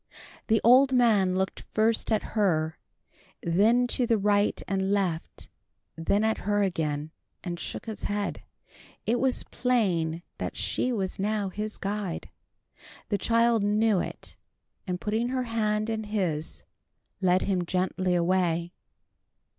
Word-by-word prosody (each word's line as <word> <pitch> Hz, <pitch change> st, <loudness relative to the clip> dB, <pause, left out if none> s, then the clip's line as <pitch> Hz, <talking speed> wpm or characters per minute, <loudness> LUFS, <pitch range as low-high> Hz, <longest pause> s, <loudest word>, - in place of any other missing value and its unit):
The 225 Hz, -1 st, +3 dB
old 260 Hz, +3 st, +6 dB
man 215 Hz, -7 st, +3 dB
looked 190 Hz, 0 st, -1 dB
first 220 Hz, +1 st, +2 dB
at 215 Hz, -, +2 dB
her, 160 Hz, -7 st, +1 dB, 0.6 s
then 215 Hz, +9 st, +3 dB
to 245 Hz, -1 st, +1 dB
the 230 Hz, -2 st, +3 dB
right 205 Hz, 0 st, +2 dB
and 195 Hz, 0 st, 0 dB
left, 185 Hz, -5 st, -2 dB, 0.5 s
then 200 Hz, +6 st, +1 dB
at 220 Hz, 0 st, +1 dB
her 205 Hz, 0 st, +1 dB
again, 155 Hz, -5 st, -2 dB, 0.3 s
and 175 Hz, -2 st, -4 dB
shook -, -, -4 dB
his 220 Hz, -2 st, -5 dB
head. 205 Hz, 0 st, -2 dB, 0.6 s
It 235 Hz, +2 st, +1 dB
was 265 Hz, -1 st, +2 dB
plain 180 Hz, -10 st, 0 dB, 0.2 s
that -, -, -4 dB
she 255 Hz, -, 0 dB
was 195 Hz, -6 st, -2 dB
now 205 Hz, 0 st, 0 dB
his 210 Hz, +3 st, -4 dB
guide. 200 Hz, -3 st, -4 dB, 0.8 s
The 205 Hz, -, 0 dB
child 230 Hz, +1 st, +3 dB
knew 210 Hz, 0 st, +2 dB
it, -, -, -6 dB, 0.5 s
and 180 Hz, -1 st, -2 dB
putting 220 Hz, +4 st, -1 dB
her 255 Hz, 0 st, -1 dB
hand 215 Hz, -2 st, 0 dB
in 220 Hz, -1 st, -2 dB
his, 180 Hz, -8 st, -2 dB, 0.6 s
led 185 Hz, 0 st, +3 dB
him 185 Hz, -3 st, 0 dB
gently 185 Hz, +1 st, 0 dB
away. 175 Hz, -1 st, +1 dB
205 Hz, 135 wpm, -27 LUFS, 180-220 Hz, 0.8 s, old